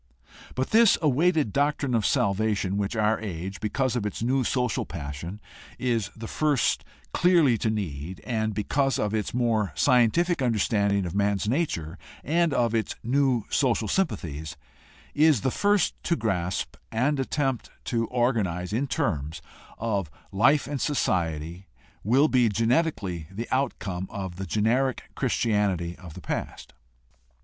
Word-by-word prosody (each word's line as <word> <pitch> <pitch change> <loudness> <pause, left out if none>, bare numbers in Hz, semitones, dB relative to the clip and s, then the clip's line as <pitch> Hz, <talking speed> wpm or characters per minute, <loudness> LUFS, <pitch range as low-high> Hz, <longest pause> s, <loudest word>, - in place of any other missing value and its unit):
But 130 +1 -2
this 225 -1 +6
awaited 155 - +2
doctrine 145 -2 +1
of 110 -3 +2
salvation, 100 -1 +1
which 100 +2 -1
our 110 0 +2
age, 95 -2 -5
because 125 +4 -1
of 120 - -1
its 105 +2 -3
new 130 +2 +2
social 125 -1 0
passion, 85 +4 -6 0.4
is 115 -5 0
the 115 0 -7
first 150 -3 +1 0.3
clearly 170 -8 +4
to 110 - 0
need, 90 -5 -4
and, 110 -3 -1
because 135 +5 +1
of 105 0 -1
its 110 -2 -1
more 115 -6 +1
scientific 130 - +3
understanding 100 -4 +1
of 85 - -4
man's 100 0 +1
nature 95 - -1 0.2
and 170 +3 +2
of 120 -4 +1
its 110 -1 -1
new 130 -2 +2
social 120 -5 +1
sympathies, 80 - -2 0.6
is 150 -6 +4
the 130 - 0
first 205 +1 +2
to 170 - +2
grasp 90 - -2
and 135 +6 +1
attempt 135 -2 -1
to 115 -2 -1
organize 105 -8 0
in 130 +6 0
terms 75 - -2 0.4
of 100 -7 -1 0.2
life 135 +9 +4
and 140 +1 -4
society, 85 - -1 0.4
will 130 +8 +4
be 125 -5 +3
genetically 105 - 0
the 110 +5 -5
outcome 100 -9 -1
of 95 -3 -6
the 95 0 -5
generic 115 +7 0
Christianity 100 -6 0
of 85 -4 -11
the 90 - -9
past. - - -5
110 Hz, 140 wpm, -26 LUFS, 95-135 Hz, 0.6 s, this